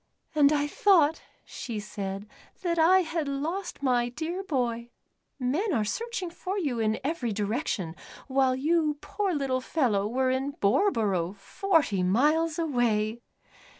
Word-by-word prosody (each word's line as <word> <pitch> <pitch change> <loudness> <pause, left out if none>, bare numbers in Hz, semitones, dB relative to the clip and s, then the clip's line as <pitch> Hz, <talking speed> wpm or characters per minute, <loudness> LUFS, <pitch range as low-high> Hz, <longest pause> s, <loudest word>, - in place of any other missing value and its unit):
"And 295 -2 +5
I 290 -1 +2
thought," 325 -1 +3 0.2
she 225 -3 -5
said, 200 -1 -5 0.4
"that 340 -2 0
I 365 +4 +6
had 330 -3 -2
lost 315 +5 -3
my 245 -2 +2
dear 325 +9 -4
boy. 240 -8 -2 0.5
Men 295 - 0
are 220 -6 +1
searching 450 - -3
for 375 +3 -4
you 280 - -1
in 220 0 +1
every 270 -5 -1
direction, 205 - -2 0.3
while 265 -1 +2
you, 305 +2 +1
poor 400 +4 -2
little 265 -3 0
fellow, 230 -9 +1
were 255 +3 +1
in 270 +2 -1
Boreborough, 200 - +1
forty 305 - +1
miles 305 - +2
away." 235 -8 0
275 Hz, 135 wpm, -28 LUFS, 225-330 Hz, 0.5 s, I